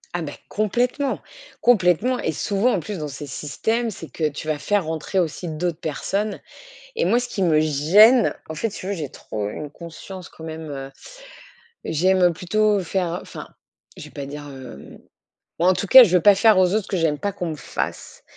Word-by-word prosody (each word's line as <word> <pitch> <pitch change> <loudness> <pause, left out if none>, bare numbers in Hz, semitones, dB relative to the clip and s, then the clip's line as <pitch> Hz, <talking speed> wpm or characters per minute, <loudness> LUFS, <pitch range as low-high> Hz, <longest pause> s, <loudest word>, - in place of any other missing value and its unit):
Ah, 175 - -1
beh, 145 -3 -5
complètement, 245 +6 -1 0.4
complètement. 235 +2 +3
Et - - -1
souvent, 200 - +1
en 195 - +1
plus, 185 +3 -6
dans 150 - -4
ces 145 +1 -7
systèmes, 220 - -2
c'est 170 -6 -9
que 155 -2 -1
tu 150 +1 -8
vas 155 -1 -1
faire 205 +4 0
rentrer 160 +4 -4
aussi 175 0 -1
d'autres 165 +1 -3
personnes. 200 +7 -3 0.6
Et 475 - +1
moi, 235 - +3
ce 245 - -6
qui 195 - -4
me 155 -3 +3
gêne, 190 - +5
en - - -4
fait, 190 +9 -2
si - - -9
tu 185 - -7
veux, 200 - -1
j'ai 160 -6 -4
trop 105 -5 -6
une 145 +7 -7
conscience 170 +3 -10
quand 160 - -14
même, 160 -1 -7
heu, 135 -1 -6 0.9
j'aime, 185 +4 +2
heu, 175 -1 +4
plutôt 210 +4 +1
faire 180 -1 -2
enfin, - - -9 0.5
je - - -9
vais - - -12
pas 140 - -7
dire, 145 +1 -8
hem, 130 - -11 0.6
moi, 175 - +3
en 185 - +5
tout 200 - -3
cas, 260 +3 +11
je 185 -5 0
veux 175 - +2
pas 205 -1 +7
faire 210 0 +5
aux 185 -1 +5
autres 215 - +2
ce - - -14
que 195 - -1
j'aime 160 -4 +1
pas 200 +5 -2
qu'on 180 -4 -4
me 155 - -5
fasse. - - -5
175 Hz, 210 wpm, -22 LUFS, 155-205 Hz, 0.9 s, cas